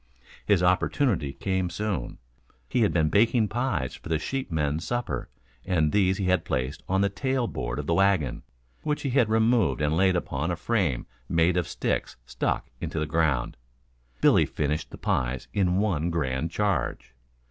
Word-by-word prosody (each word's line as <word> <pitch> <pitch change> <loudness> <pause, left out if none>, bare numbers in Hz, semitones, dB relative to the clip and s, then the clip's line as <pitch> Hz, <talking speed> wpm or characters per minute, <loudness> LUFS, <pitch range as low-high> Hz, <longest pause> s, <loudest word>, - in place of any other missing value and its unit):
His 100 -4 +4
opportunity 90 - +2
came 95 -2 -1
soon. 100 +2 -3 0.5
He 120 - 0
had 105 - +3
been 80 -3 +2
baking 110 - +3
pies 110 - -1
for - - -10
the 80 - +2
sheepmen's 80 - -2
supper 120 - -3 0.3
and 80 -5 +1
these 95 -2 +3
he 100 - -2
had 95 0 +2
placed 65 +4 -2
on 95 +1 +2
the 100 - +3
tail 130 +5 -1
board - - -4
of - - -3
the 85 - +1
wagon, 95 -8 +2 0.4
which 150 -1 -2
he 135 - -1
had 120 -4 +3
removed 110 -2 +3
and 75 +1 +1
laid 95 +1 +3
upon 80 -2 -2
a 85 - 0
frame 85 - 0 0.2
made 85 +2 +3
of 90 -2 0
sticks - - -2
stuck - - -2
into - - -4
the 75 - 0
ground. 75 -5 0 0.6
Billy - - +5
finished 75 +1 -2
the - - -10
pies 65 0 -1
in 90 -2 +2
one 90 -6 +1
grand 75 -2 -1
charge. 85 -11 -1
90 Hz, 170 wpm, -26 LUFS, 75-105 Hz, 0.6 s, Billy